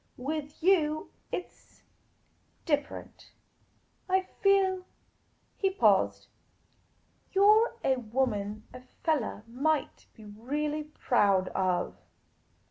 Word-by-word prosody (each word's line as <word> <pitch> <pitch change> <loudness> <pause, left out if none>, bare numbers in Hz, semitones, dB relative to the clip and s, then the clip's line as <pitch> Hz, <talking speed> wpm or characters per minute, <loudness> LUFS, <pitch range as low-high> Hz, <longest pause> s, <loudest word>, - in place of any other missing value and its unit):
With 295 +3 -5
you, 315 -5 +2 0.2
it 360 - -4
's - - -27 0.8
different. 290 -3 -3 0.8
I 380 +1 +3 0.2
feel 380 -2 +3 0.2
" - - -42
— - - -42
he 390 - +3
paused 385 - +2 0.4
— - - -40
" - - -39
you 390 - +4
're 445 +3 +5
a 265 -1 +2
woman 215 -3 -2
a 250 - -9 0.2
fellah 285 -10 0
might 285 +6 -1
be 220 - -14
really 295 +8 -3
proud 205 -10 +2
of." 185 -2 -1
295 Hz, 115 wpm, -29 LUFS, 225-365 Hz, 0.8 s, re